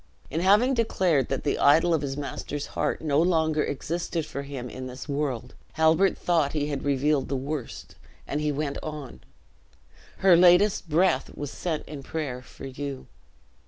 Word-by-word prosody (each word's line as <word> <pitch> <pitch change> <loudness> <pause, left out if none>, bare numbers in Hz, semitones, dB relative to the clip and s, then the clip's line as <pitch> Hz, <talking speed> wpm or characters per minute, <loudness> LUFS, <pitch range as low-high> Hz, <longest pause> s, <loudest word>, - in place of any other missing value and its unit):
In 160 - -1
having 210 +9 +4
declared 185 - +1
that 135 - -2
the 145 - 0
idol 160 +4 +5
of 160 - +1
his 135 -1 -3
master's 145 0 -4
heart - - -1
no 150 -1 +2
longer 160 -3 +2
existed 165 +3 -3
for 140 - -5
him 140 -3 -6
in 130 +1 -7
this 130 +3 -8
world, 140 -4 -3 0.2
Halbert 160 +4 +3
thought 165 -5 +1
he 150 -1 -1
had 140 -2 -3
revealed 140 0 +1
the 140 - -1
worst, 135 0 -5 0.3
and 145 - -2
he 150 0 +1
went 145 0 -3
on. 150 -4 -7 1.0
"Her 190 -2 +6
latest 180 +1 +5
breath 160 -3 +1
was 145 -1 -5
sent 165 -4 -3
in 145 -2 -7
prayer 135 -4 -4
for 125 - -12
you. 135 0 -6
150 Hz, 165 wpm, -26 LUFS, 140-165 Hz, 1.0 s, Her